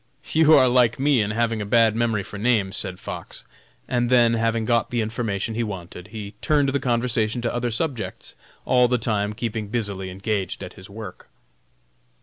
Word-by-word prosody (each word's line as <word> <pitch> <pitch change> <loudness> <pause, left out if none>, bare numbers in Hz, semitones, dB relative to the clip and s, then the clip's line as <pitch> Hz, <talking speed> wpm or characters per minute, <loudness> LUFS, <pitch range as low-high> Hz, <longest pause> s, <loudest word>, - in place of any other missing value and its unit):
"You 160 0 +6
are 130 -2 +6
like 120 -2 +3
me 140 -3 +3
in 100 - -1
having 115 0 0
a - - -1
bad 115 0 +4
memory 115 -3 0
for 105 +1 -9
names," 105 -4 +1
said 90 -1 -2
Fox, - - -8 0.4
and 120 -1 0
then, 120 -2 +5
having 115 0 0
got 120 0 +1
the 120 - -1
information 110 -1 -2
he 115 - -1
wanted, 90 -4 -6
he 105 -1 -8
turned 145 -2 +2
the 140 +1 0
conversation 120 -2 0
to 120 - -1
other 120 0 -1
subjects, 125 +1 -3 0.3
all 125 -1 +4
the 125 +1 +1
time 105 -3 -1
keeping 110 -1 -3
busily 100 -4 -3
engaged 95 0 -3
at 90 - -8
his 95 - -13
work. 105 +1 -9
115 Hz, 180 wpm, -23 LUFS, 105-120 Hz, 0.4 s, You